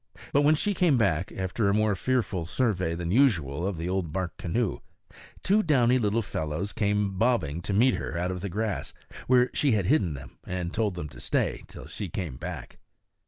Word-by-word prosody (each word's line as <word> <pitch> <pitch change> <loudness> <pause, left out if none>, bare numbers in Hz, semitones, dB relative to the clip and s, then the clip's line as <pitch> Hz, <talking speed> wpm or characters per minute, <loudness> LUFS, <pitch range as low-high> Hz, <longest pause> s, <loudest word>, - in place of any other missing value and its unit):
But 145 - +5
when 150 +2 +5
she 205 +6 0
came 175 -8 +3
back, 90 -6 +1
after 95 +3 -1
a 100 - +2
more 110 -1 +2
fearful 105 -7 -1
survey 95 -5 0
than 85 0 -3
usual 90 - +2
of 100 -4 -3
the 85 +2 -3
old 90 -4 -1
bark 95 +1 -3
canoe, 105 +5 -1 0.6
two 205 +3 +4
downy 130 - +3
little 110 0 +1
fellows 80 +2 -3
came 105 -3 0
bobbing 90 - +1
to 95 - -4
meet 115 +6 +4
her 80 - -4
out 90 +2 -1
of 90 -1 -5
the 100 - -3
grass, 105 +2 -3 0.3
where 125 0 +4
she 140 -5 +2
had 100 -4 +1
hidden 95 - +2
them 65 -2 -11
and 90 -1 -4
told 105 -4 0
them 85 -4 -4
to 65 -3 -13
stay - - -1
till - - -11
she 100 - -6
came 80 -5 -4
back. - - -7
100 Hz, 200 wpm, -27 LUFS, 85-120 Hz, 0.6 s, But